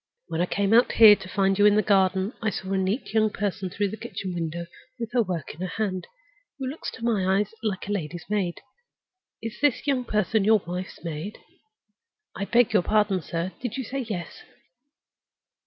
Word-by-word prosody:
When 165 - -1
I 180 - +1
came 200 +2 +1
out 240 +2 +5
here 220 -2 +9
to 190 - -10
find 195 0 +1
you 205 - +7
in 205 - +5
the 215 - +3
garden, 190 +1 +2
I 220 - +1
saw 190 -2 -5
a - - +2
neat 195 +6 -2
young 215 -1 +4
person 200 -2 -3
through 200 +2 -1
the 215 - -6
kitchen 190 -4 -5
window, 170 0 -3 0.3
with 230 -1 -4
her 245 - +4
work 175 -8 -3
in 160 - -12
her 185 - -1
hand, 185 -2 -3 0.5
who 270 - -4
looked 275 +5 -5
to 230 - -6
my 195 -5 +2
eyes 210 +1 -1
like 205 -5 -2
a - - -3
lady's 175 -4 -4
maid. 195 -4 -1 0.8
Is 225 0 -5
this 290 -1 +2
young 270 -3 +1
person 215 -1 +1
your 215 -1 +4
wife's 180 +2 -6
maid? 165 +5 -5 1.0
I 200 - -3
beg 235 +2 +3
your - - +5
pardon, 205 -1 +2
sir, 170 +3 -3
did 245 -2 -3
you 265 - -2
say 270 +4 -4
yes? 210 -9 -5
200 Hz, 200 wpm, -26 LUFS, 185-220 Hz, 1.0 s, here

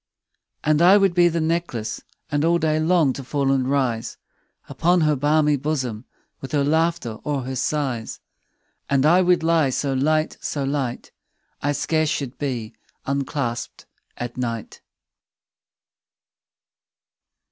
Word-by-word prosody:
And 155 +1 +2
I 185 +4 +7
would 195 -3 +3
be 175 0 +5
the 170 0 0
necklace, 160 -9 -2 0.3
And 145 0 +1
all 170 +1 +3
day 155 -2 +1
long 160 -4 +3
to 135 - -7
fall 135 +1 0
and 130 -1 +1
rise 125 -5 -1 0.5
Upon 175 +1 +2
her 155 -1 +3
balmy 150 +1 +2
bosom, 130 -6 -3 0.3
15 - - -43
With 135 - -7
her 145 -1 +2
laughter 160 -1 +1
or 145 -3 -2
her 130 +1 -5
sighs: 130 -3 -2 0.7
And 140 0 +2
I 175 +4 +5
would 180 -2 +3
lie 160 -4 +3
so 135 +1 -1
light, 155 +4 +1
so 145 - -3
light, 135 -3 -3 0.5
I 145 +1 0
scarce 155 +1 0
should 135 -4 -3
be 125 -6 -3 0.3
unclasp'd 140 -3 -3 0.3
at 120 0 -6
night. 115 -3 -4
145 Hz, 135 wpm, -22 LUFS, 130-160 Hz, 0.7 s, I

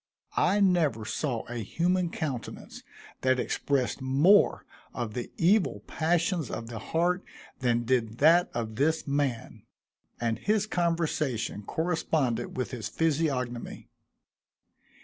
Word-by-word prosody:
I 195 +4 +3
never 160 - +2
saw 120 0 -2
a 120 - -5
human 175 - 0
countenance 140 -8 -5 0.4
that 130 0 +2
expressed 135 0 -1
more 145 +10 +4 0.3
of 115 -3 -3
the 120 0 -4
evil 190 +4 +3
passions 170 -1 0
of 115 0 -5
the 115 -2 -6
heart 175 - 0 0.4
than 120 -2 +1
did 115 -2 0
that 165 +5 +5
of 110 -2 -4
this 160 +4 +1
man, 140 -5 -2 0.6
and 115 -1 -1
his 210 0 +1
conversation 160 - -1
corresponded 150 - -1
with 130 - -2
his 120 -5 -4
physiognomy. 140 -7 -1
140 Hz, 115 wpm, -28 LUFS, 120-170 Hz, 0.6 s, that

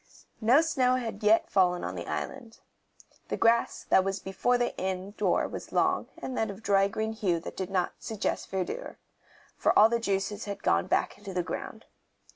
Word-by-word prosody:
No 245 +7 +6
snow 260 -6 +2
had 230 -5 -3
as - - -18
yet 215 +1 +3
fallen 180 -2 +3
on - - -3
the - - -6
islands. 240 -4 -5 0.7
The - - -2
grass 230 0 +2
that 190 - +5
was 195 0 -1
before 220 +6 0
the 245 0 -1
inn 190 +1 -3
door - - +1
was - - -8
long - - +1
and 260 - -4
of 220 - +1
that 200 +1 -8
dry 195 -2 +4
green 220 +2 -3
hue 190 -6 0
that - - -8
did 190 -1 -4
not 185 -2 0
suggest 220 -3 -3
verdure, 190 - -4 0.6
for - - +2
all 215 - +8
the 235 0 +1
juices 200 -1 -2
had 200 -1 -6
gone 85 +1 +2
back - - 0
into 200 -2 -8
the 180 - +1
ground. 180 - -6
205 Hz, 195 wpm, -28 LUFS, 190-230 Hz, 0.7 s, all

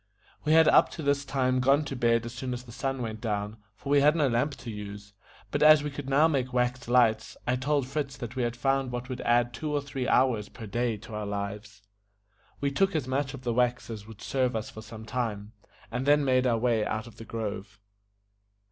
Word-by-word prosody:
We 155 - +3
had 160 0 +7
up - - +6
to 160 - -6
this 140 0 +1
time 130 -2 0
gone 140 +4 +3
to 140 - -4
bed 115 -1 +2
as 120 - -6
soon 125 0 -4
as 125 0 -6
the 120 - -13
sun 135 +1 -3
went 110 -1 -5
down, 105 -1 -2 0.2
for 140 - -9
we 145 -1 +5
had 150 +2 +5
no 150 -4 +3
lamp 130 +4 0
to 120 -1 -8
use; 105 -1 -8 0.4
but 145 - -1
as 155 -1 +7
we 150 - -3
could 135 -1 -6
now 145 +4 +5
make 130 -5 -1
wax 125 0 0
lights, 115 -3 +2
I 125 - +1
told 140 +1 0
Fritz 140 0 -3
that 120 0 -7
we 130 - -1
had 120 -1 -1
found 135 +1 0
what 125 +1 -5
would 130 -1 -4
add 120 0 +2
two 155 +5 -4
or 145 - +1
three 135 -2 -4
hours 120 -5 +2
per 115 - -10
day 115 +2 -1
to 110 - -12
our 105 -1 -3
lives. 100 +1 -5 0.8
We 140 0 0
took 195 +5 +1
as 145 -5 -1
much 135 +1 -1
of 130 - -11
the 120 -2 -1
wax 120 0 0
as 105 -1 -8
would 110 -2 -12
serve 130 -3 0
us 110 0 -3
for 110 - -9
some 110 0 -10
time, 110 -3 -3 0.4
and 125 +4 -3
then 145 0 +5
made 130 -1 +3
our 115 -2 +2
way 115 -2 +1
out 110 +1 -2
of 115 -2 -14
the 115 - -9
grove. 105 -3 -5
125 Hz, 235 wpm, -28 LUFS, 110-135 Hz, 0.8 s, had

